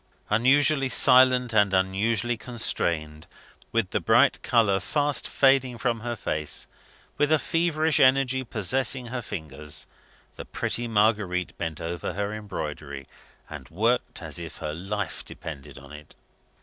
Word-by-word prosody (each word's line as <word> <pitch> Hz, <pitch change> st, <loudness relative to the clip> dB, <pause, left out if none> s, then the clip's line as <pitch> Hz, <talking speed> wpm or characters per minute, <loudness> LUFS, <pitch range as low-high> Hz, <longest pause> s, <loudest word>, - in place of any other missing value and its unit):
Unusually 135 Hz, +5 st, +3 dB
silent 125 Hz, -1 st, +5 dB
and 100 Hz, -3 st, +3 dB
unusually 100 Hz, +5 st, +1 dB
constrained 85 Hz, -10 st, -2 dB, 0.4 s
with 115 Hz, -5 st, 0 dB
the -, -, 0 dB
bright -, -, +3 dB
colour 100 Hz, -5 st, +2 dB
fast 145 Hz, -, -1 dB
fading 135 Hz, -3 st, +2 dB
from 115 Hz, -1 st, -1 dB
her 120 Hz, +1 st, -4 dB
face, 75 Hz, -, -4 dB, 0.5 s
with 145 Hz, +1 st, +2 dB
a 155 Hz, -, +5 dB
feverish 160 Hz, -1 st, +1 dB
energy 130 Hz, 0 st, +3 dB
possessing 125 Hz, +4 st, -1 dB
her 125 Hz, 0 st, -4 dB
fingers 75 Hz, -, -7 dB, 0.5 s
the -, -, -7 dB
pretty 120 Hz, 0 st, -2 dB
Marguerite 105 Hz, -5 st, 0 dB
bent 80 Hz, -2 st, -4 dB
over 85 Hz, +1 st, -4 dB
her 100 Hz, +2 st, -3 dB
embroidery, 75 Hz, -9 st, -6 dB, 0.4 s
and 70 Hz, -3 st, -10 dB
worked 115 Hz, +8 st, -1 dB
as -, -, -3 dB
if -, -, -8 dB
her 75 Hz, -, -5 dB
life 95 Hz, +1 st, -4 dB
depended 70 Hz, -5 st, -9 dB
on 70 Hz, +1 st, -13 dB
it. 75 Hz, 0 st, -13 dB
110 Hz, 135 wpm, -25 LUFS, 85-130 Hz, 0.5 s, silent